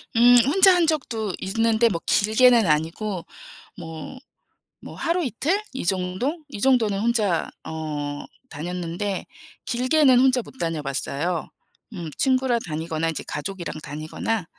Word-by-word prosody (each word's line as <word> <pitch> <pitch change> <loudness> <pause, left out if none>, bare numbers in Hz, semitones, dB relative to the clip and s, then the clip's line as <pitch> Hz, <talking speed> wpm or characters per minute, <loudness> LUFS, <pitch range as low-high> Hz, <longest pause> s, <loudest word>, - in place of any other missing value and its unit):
음. 240 +2 +7
혼자 375 +7 +6
한 345 -2 +3
적도 230 - -1
있는데 225 +3 +2
뭐 170 -5 -3
길게는 225 +1 +4
아니고 165 +5 -1 0.5
뭐 165 +10 -8 0.7
뭐 - - -9
하루 345 +2 0
이틀 300 - -1
이 265 - -5
정도 190 - -1
이 235 -8 -8
정도는 230 -6 +3
혼자 210 -6 +1
어 150 -2 -5 0.3
다녔는데 180 +5 -4 0.4
길게는 255 +2 +3
혼자 255 -1 +4
못 265 - -15
다녀봤어요. 155 +1 -2 0.4
음. 170 -6 -6
친구랑 260 -2 +2
다니거나 160 0 -2
이제 160 - -4
가족이랑 175 +3 -5
다니거나 155 +8 -3
205 Hz, 265 characters per minute, -23 LUFS, 165-255 Hz, 0.7 s, 음